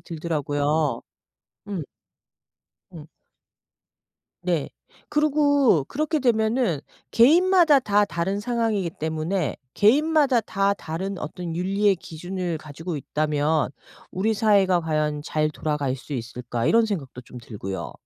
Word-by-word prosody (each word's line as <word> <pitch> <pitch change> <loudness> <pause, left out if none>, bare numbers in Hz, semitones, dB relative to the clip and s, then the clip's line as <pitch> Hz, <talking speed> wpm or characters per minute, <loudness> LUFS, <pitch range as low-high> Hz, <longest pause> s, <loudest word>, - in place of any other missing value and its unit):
들더라고요. 150 -2 -1 0.7
음. 195 -6 -4 1.1
음. 160 -5 -11 1.3
네. 175 -5 -1 0.4
그리고 285 - +3
그렇게 305 - -1
되면은 225 - +1 0.3
개인마다 330 +4 +5
다 205 -4 +2
다른 190 +1 -2
상황이기 225 -5 -1
때문에 160 +2 -2 0.2
개인마다 285 +3 +4
다 200 -2 0
다른 190 +3 -5
어떤 170 +2 -5
윤리의 195 +2 +2
기준을 175 +1 -5
가지고 155 +3 -6
있다면 150 0 0 0.4
'우리 215 +4 0
사회가 200 -4 +3
과연 155 -2 -1
잘 155 0 0
돌아갈 150 -3 -2
수 135 - -11
있을까?' 120 -1 -4
이런 230 0 +4
생각도 145 - -5
좀 125 - -11
들고요. 95 -7 -6
180 Hz, 255 characters per minute, -24 LUFS, 150-220 Hz, 1.3 s, 개인마다